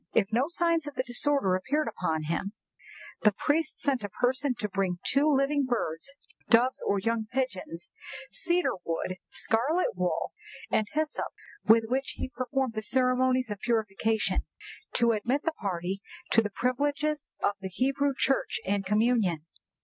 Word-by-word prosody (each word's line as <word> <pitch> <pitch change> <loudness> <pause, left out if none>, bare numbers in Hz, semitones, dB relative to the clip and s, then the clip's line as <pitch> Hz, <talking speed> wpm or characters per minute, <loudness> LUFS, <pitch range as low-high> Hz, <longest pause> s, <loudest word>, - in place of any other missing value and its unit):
If 200 -3 +3
no 245 +4 +3
signs 335 -2 +1
of 290 - -6
the 255 - 0
disorder 250 -4 +1
appeared 260 +10 0
upon 160 -7 -1
him, 170 +6 -2 0.7
the 210 - +6
priest 300 +9 0
sent 270 -6 +1
a 205 - -3
person 255 +5 +1
to 210 - -2
bring 190 -2 -1
two 280 +3 +4
living 280 +1 +2
birds 230 -2 -2 0.4
(doves 245 +3 +4
or 200 - +3
young 225 +2 0
pigeons), 190 -10 -3 0.4
cedar 350 0 +1
wood, 170 +2 -2
scarlet 275 - +1
wool, 180 0 -1 0.4
and 215 - +2
hyssop, 310 0 -1 0.4
with 225 +1 +7
which 265 +4 -1
he - - -3
performed 255 -1 -1
the 215 - -2
ceremonies 255 0 +2
of 205 - -4
purification, 220 -1 0 0.5
to 235 -1 +4
admit 240 +6 0
the 325 - +1
party 190 - -3 0.3
to 225 - +6
the 210 - -2
privileges 285 +6 0 0.2
of - - +4
the 190 - -4
Hebrew 275 +7 +1
Church 270 - +1
and 200 +1 0
communion. 210 -5 +2
240 Hz, 150 wpm, -29 LUFS, 200-275 Hz, 0.7 s, with